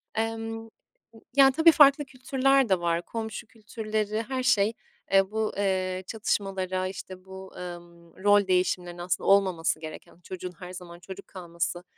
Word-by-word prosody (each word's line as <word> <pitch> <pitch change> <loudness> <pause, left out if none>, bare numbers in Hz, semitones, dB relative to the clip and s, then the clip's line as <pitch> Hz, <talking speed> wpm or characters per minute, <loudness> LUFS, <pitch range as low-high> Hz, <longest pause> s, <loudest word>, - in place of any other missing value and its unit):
Emm, 225 0 -3 0.7
ya 270 -1 +7
tabii 320 +4 +6
farklı 290 -1 +6
kültürler 270 0 +1
de 190 -2 +3
var. 170 0 0
Komşu 220 +3 -6
kültürleri, 215 -1 -3
her 260 0 -2
şey, 225 -3 +3 0.4
eee, 195 0 +4
bu, 220 0 -1
eee, 185 -2 -1
çatışmalara, 190 -3 -2
işte 185 0 -9
bu, 190 0 -10
ımm, 175 -1 -10
rol 205 -1 +5
değişimlerinin 180 -1 0
aslında 175 0 -2
olmaması 185 -5 +3
gereken, 155 +1 -10
çocuğun 185 -1 -6
her 180 -1 -8
zaman 175 -1 -10
çocuk 190 +1 -10
kalması, 175 -1 -4
195 Hz, 140 wpm, -27 LUFS, 180-225 Hz, 0.7 s, ya